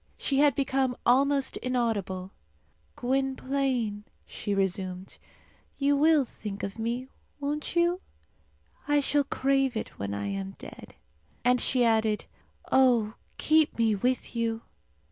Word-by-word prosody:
She 275 -1 0
had 290 -3 +5
become 265 -2 0
almost 275 +2 +3
inaudible. 210 -7 -2 0.6
"Gwynplaine," 260 -4 -1 0.2
she 205 - -3
resumed, 190 -1 -2 0.6
"you 285 0 +2
will 300 -1 +4
think 210 -3 -7
of 200 +3 -5
me, 240 +3 -2 0.3
won't 295 +3 -3
you? 345 +2 +2 0.9
I 290 0 +4
shall 290 +1 +2
crave 270 -2 +1
it - - -6
when 100 0 -3
I 100 0 -3
am 100 -1 -4
dead." - - -11 0.5
And 250 0 +4
she 255 -1 +3
added, 220 -2 +2 0.5
"Oh, 240 -5 +4 0.2
keep 315 -1 +3
me 225 -2 +3
with 245 +5 -1
you!" 230 -1 -1
250 Hz, 125 wpm, -28 LUFS, 210-275 Hz, 0.9 s, had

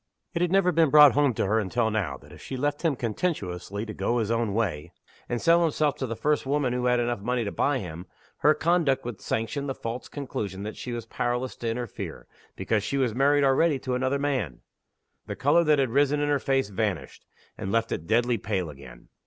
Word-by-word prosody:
It 170 - -1
had 175 -1 +1
never 195 -2 +4
been 165 -2 +3
brought 150 0 +8
home 145 -4 +2
to - - 0
her 110 +3 +2
until 110 +2 0
now, 90 -11 -1
that - - -18
if - - -13
she 130 - -6
left 145 +2 -1
him 160 -5 +1
contemptuously 105 - -3
to 110 - -6
go 120 - -1
his 110 -2 0
own 115 -3 0
way, 90 -10 -2 0.4
and 120 - -1
sell 170 +5 +4
himself 155 -3 +1
to 130 - -3
the 115 - -4
first 150 +5 0
woman 135 -2 0
who 125 0 -1
had 125 0 +3 0.2
money 125 +2 -1
enough 100 - -3
to - - -13
buy 145 -1 +2
him, 90 -4 -7 0.3
her 150 +1 +4
conduct 155 -5 +1
would 120 -5 -6
sanction 140 +6 -2
the 135 - -3
false 115 +2 -5
conclusion 105 -9 -5
that 105 - -5
she 125 - -6
was 120 -1 -4
powerless 120 +2 -2
to 115 - -3
interfere, 120 -1 -5 0.3
because 110 -2 0
she 125 +6 -2
was 130 -5 +1
married 140 +3 +3
already 140 +3 +3
to 130 0 -4
another 130 +2 0
man. 130 - -2 0.7
The - - -4
color 150 +5 +3
that 150 -1 +4
had 135 -4 +1
risen 145 +2 +2
in 145 0 0
her 145 -1 +2
face 135 -4 0
vanished, 100 -3 -3 0.3
and 95 - -5
left 115 +1 0
it 80 - -4
deadly 120 +1 +2
pale 95 -5 -2
again. 65 -4 -14
125 Hz, 220 wpm, -26 LUFS, 110-145 Hz, 0.7 s, brought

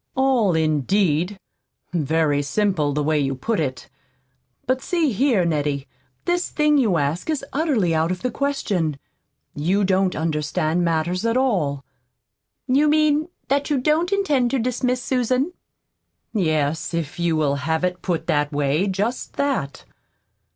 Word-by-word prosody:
"All, 255 -9 +2
indeed! 160 +4 +1 0.5
Very 155 -2 +1
simple, 155 0 0
the 150 +1 -1
way 155 0 +1
you 135 -1 0
put 220 - -1
it. 130 -4 -3 0.8
But 260 +1 0
see 335 -6 +1
here, 225 -4 +2
Nettie, 145 -4 -1 0.4
this 350 +1 0
thing 300 -1 +3
you 210 -9 +2
ask 150 - -1
is 295 -3 -1
utterly 265 - +1
out 160 +1 +1
of 185 0 -3
the 250 - 0
question. 200 - -1 0.6
You 180 +8 +1
don't 190 -1 +2
understand 155 +1 0
matters 170 +3 0
at 230 +1 +1
all." 175 - 0 0.8
"You 275 +3 +3
mean 305 0 +3 0.2
that 280 +2 0
you 290 - +2
don't 310 +7 +1
intend 300 -12 +2
to 270 - 0
dismiss 250 +1 -1
Susan?" 260 +5 0 0.8
"Yes, 160 -3 0
if 165 -1 -4
you 170 -1 +1
will 150 -3 +1
have 160 +5 -1
it 180 -1 -1
put 175 -3 -2
that 145 0 +1
way 145 +5 +1
just 205 +6 -2
that." 255 - -2
185 Hz, 145 wpm, -22 LUFS, 155-260 Hz, 0.8 s, thing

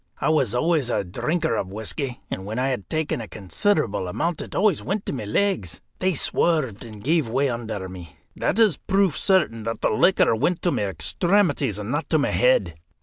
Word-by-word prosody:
I - - +1
was 135 -8 +2
always 150 -1 +1
a 120 - 0
drinker 155 - -1
of 95 - -2
whisky, 120 +5 -3
and 95 - -4
when 105 +4 -5
I 130 +2 +1
had 125 -7 -4
taken 155 -6 -1
a 110 - -7
considerable 100 - -1
amount 165 - -2
it - - -8
always 200 -4 +2
went 200 +2 -3
to - - -3
my 125 -6 -4
legs; 105 - 0 0.2
they 185 -1 +1
swerved, 140 - 0
and 110 -3 -10
gave 155 -3 +1
way 135 +4 +1
under 110 -5 -4
me. 90 -4 -10 0.2
That 180 - -1
is 215 -10 +4
proof 195 -5 +1
certain 155 - +2
that 115 0 -3
the - - +2
liquor 115 - +4
went 160 +9 0
to 175 - +2
my 105 - 0
extremities 125 - +1
and 105 +2 -5
not 145 0 -2
to 160 - +3
my 145 - +1
head. 95 -10 +2
130 Hz, 205 wpm, -24 LUFS, 105-170 Hz, 0.2 s, is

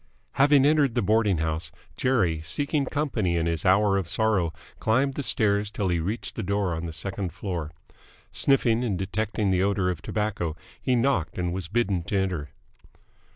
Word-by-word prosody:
Having 140 0 +4
entered 145 -5 +3
the 120 - +1
boarding 105 -2 +2
house, 80 +1 -2 0.2
Jerry, 95 -12 +1
seeking 145 - -1
company 130 - -1
in 80 - 0
his 85 -2 -1
hour 100 +1 +4
of 95 -4 -2
sorrow, 105 -5 +1 0.3
climbed 130 +5 +2
the 145 - -3
stairs 105 -5 +2
till 100 -2 -2
he 85 -1 +1
reached 100 +8 -4
a - - 0
door 100 -2 0
on 80 +1 -4
the - - -5
second 95 +3 -3
floor. 85 -6 -4 0.6
Sniffing 125 -4 +2
and 105 -7 -1
detecting 100 +2 -1
the 90 -1 +2
odour 100 -2 +1
of 85 -4 -6
tobacco, 100 -5 -2 0.3
he 130 - +1
knocked 115 - 0
and 90 -1 -1
was 90 -2 -4
bidden 100 -3 0
to 100 - -1
enter. 90 -7 -1
100 Hz, 175 wpm, -26 LUFS, 85-115 Hz, 0.6 s, Having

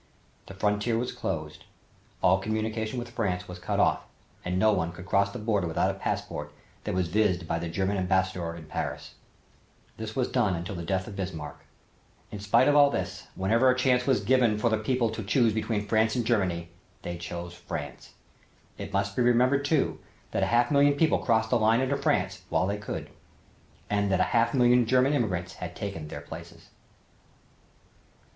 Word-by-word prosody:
The 95 - -10
frontier 105 +3 0
was 125 +2 -2
closed, - - -5 0.6
all 95 +2 +5
communication 110 +2 -2
with 120 -1 -5
France 90 -6 -2
was 90 0 -8
cut 85 - -2
off - - +2 0.4
and 90 +1 -2
no 110 +3 +4
one 85 -3 -1
could 90 +2 -10
cross 100 +1 +2
the - - -6
border 105 -5 0
without 80 - +1
a - - -10
passport 75 0 -3 0.3
that - - -2
was 90 -2 +1
vized 90 -2 +1
by 85 - -1
the 85 0 -4
German 95 +4 -1
Ambassador 95 -2 0
in 80 -2 -10
Paris. 75 - -5 0.8
This 110 -1 -6
was 130 -2 +1
done 105 -8 +1
until 85 +3 -5
the 85 - -5
death 95 +1 -1
of 105 - -8
Bismarck. 80 -7 -6 0.7
In 105 - -6
spite 105 +5 +3
of 145 - +4
all 145 -1 +7
this, - - -4
whenever 115 +7 +3
a 130 - +3
chance 125 -1 +2
was 130 -6 +3
given 120 -1 +3
for 115 +2 +1
the 110 - +1
people 120 0 0
to 115 - -5
choose 115 +2 +2
between 110 -1 -1
France 110 +2 +2
and 120 -2 0
Germany, 90 -7 0 0.3
they 85 - -4
chose 85 0 -6
France. - - -7 0.6
It - - -6
must 100 0 0
be - - +1
remembered 125 +3 +3
too, 145 0 +1 0.3
that - - -1
a - - +2
half 120 +2 +2
million 145 0 +4
people 155 +2 +3
crossed 110 -1 +1
the 120 - +3
line 110 +2 +4
into 130 +1 +1
France - - 0
while - - +2
they 100 +2 -1
could 105 - -6 0.8
and 100 -1 0
that 95 - +2
a - - +5
half 115 +3 +3
million 125 -2 +4
German 130 +3 +3
immigrants 95 -9 -1
had 90 -1 -5
taken 100 -7 -5
their 75 - -7
places. 70 - -11
105 Hz, 190 wpm, -27 LUFS, 90-120 Hz, 0.8 s, all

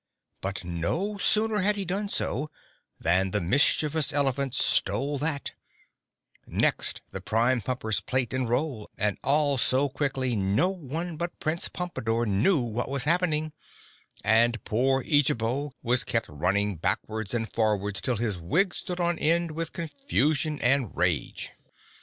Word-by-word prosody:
But 95 0 -4
no 90 - -2
sooner 215 0 +3
had 205 +2 +3
he 200 -1 -3
done 200 +3 -2
so 150 -5 -2 0.5
than 90 +3 +2
the 105 - 0
mischievous 145 - +3
elephant 140 -2 0
stole 135 +7 +1
that, 145 -1 -2 1.0
next - - +1
the - - -6
Prime 120 +3 +1
Pumper's 110 -2 -1
plate 130 +2 -1
and 130 -2 -1
roll, 125 -3 -1
and 105 -1 0
all 140 0 +2
so 135 +4 +3
quickly, 135 -3 -1
no 100 - +2
one 165 -1 -4
but 170 +2 -4
Prince 160 +2 -1
Pompadore 120 -10 -2
knew 115 - +2
what 120 +2 -3
was 140 -1 -1
happening 155 -2 +1 0.7
and 115 +1 +3
poor 130 +4 +1
Eejabo 140 -1 +1
was 125 +1 +3
kept 115 - -1
running 95 +6 0
backwards 105 +6 -2
and 115 -1 -3
forwards 105 -3 0
till 125 -4 -1
his 105 -5 -2
wig 175 - +1
stood 180 0 -5
on 175 -1 0
end 170 +1 +2
with 165 +1 -4
confusion 155 - -1
and 130 -4 +1
rage. 90 -4 -1
130 Hz, 140 wpm, -27 LUFS, 110-155 Hz, 1.0 s, sooner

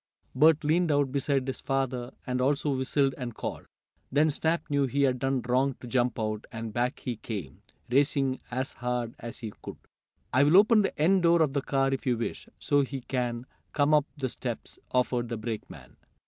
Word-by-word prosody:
Bert 155 +3 +5
leaned 165 +2 +2
out 145 -2 +2
beside 140 -1 0
his 135 -1 -4
father, 130 -2 -1
and 125 -1 -1
also 140 +1 +1
whistled 135 +1 +1
and 120 -3 -5
called. - - -5 0.4
Then 150 +3 +3
Snap 160 +2 0
knew 140 -2 +1
he 140 +3 +1
had 130 -2 +2
done 135 0 0
wrong 130 +2 +1
to - - -10
jump 120 -1 0
out, 110 -1 -2
and 115 -1 -6
back 125 +3 -1
he 125 -4 -4
came, 95 - -6 0.3
racing 135 0 +2
as 130 +2 -3
hard 120 -1 -2
as 120 +3 -7
he 110 -3 -5
could. - - -8 0.6
"I'll 145 +7 +6
open 215 +2 +6
the 195 - -2
end 185 +5 +4
door 170 -1 +5
of 140 -3 -1
the 140 - 0
car 135 0 +1
if 135 - -4
you 125 -2 +2
wish, 115 - -4
so 145 0 +2
he 135 -1 -4
can 120 -1 -2 0.3
come 145 +1 +3
up 150 -1 +4
the 130 -2 -2
steps," - - -6
offered 125 -1 0
the 115 - -3
brakeman. 110 0 -7
135 Hz, 190 wpm, -28 LUFS, 125-145 Hz, 0.6 s, I'll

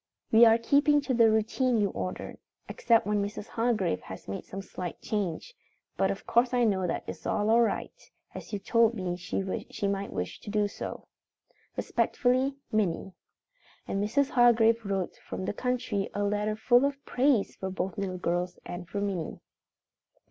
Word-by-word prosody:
"We 225 +1 +8
are 225 0 +6
keeping 285 +5 +4
to 275 -2 -2
the 230 -2 +5
routine 230 +3 +1
you 205 -2 +1
ordered 185 - -5 0.3
except 230 -1 +2
when 210 0 +1
Mrs. 205 +2 -6
Hargrave 220 - 0
has 95 0 -10
made 95 - -5
some 195 +1 -7
slight 180 -2 -6
change, 210 - -3 0.4
but - - +2
of - - -4
course 245 +1 +2
I 245 - +3
know 190 -5 +2
that - - -2
is - - -7
all 220 +2 +3
right, 230 - 0 0.4
as - - -9
you 205 - -1
told 230 +3 +3
me 185 -4 -2
she 190 +2 -3
might 200 0 -2
wish 90 - -4
to - - -9
do 210 0 +1
so. - - -7 0.7
"Respectfully, 260 +2 +1 0.2
"MINNIE." 195 -3 0 0.7
And 195 +1 -1
Mrs. 270 +7 +1
Hargrave 230 -2 +5
wrote 195 -3 -2
from 190 - -6
the - - -2
country 245 -5 -1
a 205 - 0
letter 210 +1 0
full 245 +3 +4
of 280 0 -2
praise 250 -4 +2
for 190 - -4
both 185 -1 -3
little 185 -2 -3
girls 175 +1 -1
and 175 -1 -7
for 200 - -3
Minnie. 190 -6 -3
210 Hz, 170 wpm, -29 LUFS, 190-235 Hz, 0.7 s, We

